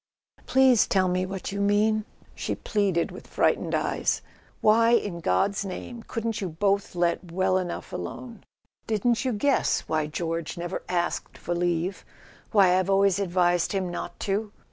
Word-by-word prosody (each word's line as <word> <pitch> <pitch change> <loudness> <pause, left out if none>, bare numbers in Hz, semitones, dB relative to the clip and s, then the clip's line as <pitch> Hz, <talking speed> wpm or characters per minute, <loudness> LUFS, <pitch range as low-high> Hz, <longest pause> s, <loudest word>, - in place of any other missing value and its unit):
"Please 260 -3 +5
tell 190 -2 +2
me 185 +1 0
what 195 0 -5
you 200 0 -3
mean," 210 +1 +2 0.3
she - - -3
pleaded 195 -5 0
with - - -11
frightened - - +1
eyes. - - 0 0.4
"Why, 230 +2 +4
in 200 -7 +1
God's 180 - +1
name, 205 +5 -6
couldn't 230 -1 -3
you 190 - -2
both 195 +4 0
let 175 0 0
well 185 +1 +2
enough 180 -2 -5
alone? 235 -4 -7 0.4
Didn't 230 +3 +1
you 255 - +1
guess 260 +6 +1
why 155 -1 -1
George 165 +2 -3
never 175 +2 -4
asked 175 -1 -2
for 175 - -3
leave—why 180 +2 0
I've 185 +1 -1
always 195 -1 +3
advised 175 -2 +1
him 185 -2 -1
not - - -6
to 205 +1 -1
195 Hz, 150 wpm, -26 LUFS, 175-210 Hz, 0.4 s, Please